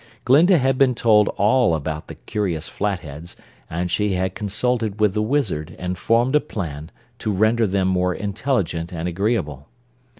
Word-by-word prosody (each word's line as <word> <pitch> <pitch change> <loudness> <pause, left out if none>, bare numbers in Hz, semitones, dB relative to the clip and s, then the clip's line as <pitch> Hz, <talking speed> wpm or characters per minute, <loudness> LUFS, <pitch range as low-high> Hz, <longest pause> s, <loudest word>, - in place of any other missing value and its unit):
Glinda 165 +8 +5
had 130 -2 +1
been 130 -3 +4
told 105 -3 +4
all 105 -1 +3
about 75 0 -4
the - - -9
curious 90 -7 -3
Flatheads 85 -5 -4 0.3
and 85 +2 -3
she 105 +2 +1
had 95 0 -1
consulted 110 +1 -1
with 105 -3 +3
the 105 - 0
Wizard 110 - -1
and 90 0 -3
formed 120 +8 +1
a - - +6
plan 80 - -6 0.3
to 110 - -2
render 110 +3 +2
them 95 -1 0
more 90 -1 +1
intelligent 100 - -2
and 85 -1 -4
agreeable. 85 - -2
100 Hz, 160 wpm, -21 LUFS, 85-115 Hz, 0.3 s, a